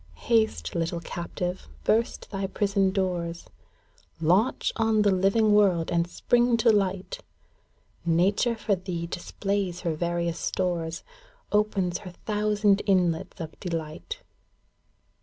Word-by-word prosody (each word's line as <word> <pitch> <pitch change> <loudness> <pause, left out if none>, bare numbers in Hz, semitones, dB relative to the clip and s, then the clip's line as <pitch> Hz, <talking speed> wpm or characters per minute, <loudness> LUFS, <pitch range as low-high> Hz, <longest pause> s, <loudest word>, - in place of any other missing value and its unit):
Haste, 220 -1 +2
little 170 0 -1
captive, 175 +2 -5 0.2
burst 230 +2 0
thy 195 -1 -2
prison 195 0 +1
doors! 180 -3 -2 0.7
Launch 185 +10 +2
on 220 -2 +3
the 205 - +4
living 200 +3 +3
world, 190 -6 +3
and 170 0 +1
spring 240 +4 +2
to 230 0 +5
light! 195 - 0 0.8
Nature 190 +8 +2
for 220 -1 0
thee 180 -2 -3
displays 185 +1 -3
her 170 -3 -1
various 170 +1 -1
stores. 170 -2 -2 0.5
Opens 200 -4 +1
her 180 -3 -10
thousand 210 -1 +2
inlets 185 -2 +1
of 160 -2 -5
delight. 170 - -5
190 Hz, 115 wpm, -27 LUFS, 170-210 Hz, 0.8 s, to